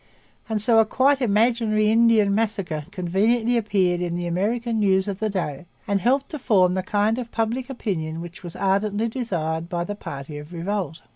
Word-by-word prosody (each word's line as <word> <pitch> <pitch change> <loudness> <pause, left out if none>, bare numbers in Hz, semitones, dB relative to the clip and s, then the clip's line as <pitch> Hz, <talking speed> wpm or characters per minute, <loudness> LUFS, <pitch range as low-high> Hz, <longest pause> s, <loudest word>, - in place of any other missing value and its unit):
And 220 -1 0
so 225 +2 +4
a - - +7
quite 270 +4 +2
imaginary 215 -1 +2
Indian 225 -3 +4
massacre 200 -8 -1
conveniently 210 +6 +1
appeared 190 -6 +1
in 175 -1 -2
the 175 0 -3
American 220 +6 -1
news 190 -1 +2
of 200 -1 -4
the 215 0 0
day 175 -5 -4 0.2
and 200 -2 +1
helped 265 +5 +1
to 305 - -5
form 190 -8 +3
the 185 - 0
kind 210 +5 0
of 240 -2 -5
public 230 +4 -2
opinion 165 -11 -3
which 170 0 -9
was 175 -3 -7
ardently 205 +3 0
desired 170 -9 -3
by 175 -2 -2
the 205 - -4
party 145 -6 -7
of 150 +4 -11
revolt. 175 -1 -3
205 Hz, 185 wpm, -23 LUFS, 175-225 Hz, 0.2 s, a